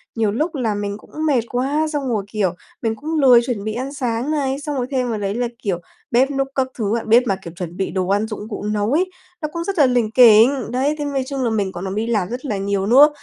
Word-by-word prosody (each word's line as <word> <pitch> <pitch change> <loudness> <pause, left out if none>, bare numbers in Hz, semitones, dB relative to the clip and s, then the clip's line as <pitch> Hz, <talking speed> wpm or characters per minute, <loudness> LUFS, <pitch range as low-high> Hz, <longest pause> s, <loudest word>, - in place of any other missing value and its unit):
nhiều 220 -3 +1
lúc 310 +8 -1
là 225 -6 -1
mình 205 0 -3
cũng - - -19
mệt 270 -6 +3
quá, 275 +5 0
xong 280 -2 -2
rồi, 210 -4 0
kiểu, 200 -4 -1 0.3
mình 225 -1 -1
cũng 315 +6 -4
lười 250 -4 +7
chuẩn 225 -6 -3
bị 215 0 -3
ăn 260 +4 -4
sáng 250 0 -2
này, 275 -2 -1
xong 295 -1 -4
rồi 250 -1 -1
thêm 255 -2 0
vào 220 -2 -2
đấy 200 +1 -2
là, 245 0 0 0.2
kiểu, 185 -4 -1 0.3
bếp 260 +4 +3
núc 270 -1 0
các 265 -1 +1
thứ 215 -1 -1
á. - - -4
Bếp 235 +3 +6
mà, 195 - +2
kiểu, 170 -2 -9
chuẩn 175 0 -6
bị 190 - -2
đồ 185 -1 -1
ăn, 205 +3 +1
dụng 215 0 -7
cụ 205 - -5
nấu 210 +2 -1
ấy, 370 +5 +1 0.3
nó 305 - -1
cũng 335 0 -3
rất 390 0 -3
là 290 - +6
lỉnh 245 -4 +1
kỉnh, 240 +2 +6
đấy. 275 +4 +1
Thế 295 - -2
nói 275 -2 -1
chung 275 -2 -3
là 235 - +1
mình 205 -4 -1
còn 175 - -7
làm 190 +1 -3
đi 225 +2 -1
làm 210 -6 0
rất 250 +4 -5
là 210 -6 -2
nhiều 195 0 -1
nữa, 280 +6 +7
235 Hz, 275 wpm, -20 LUFS, 205-270 Hz, 0.3 s, lười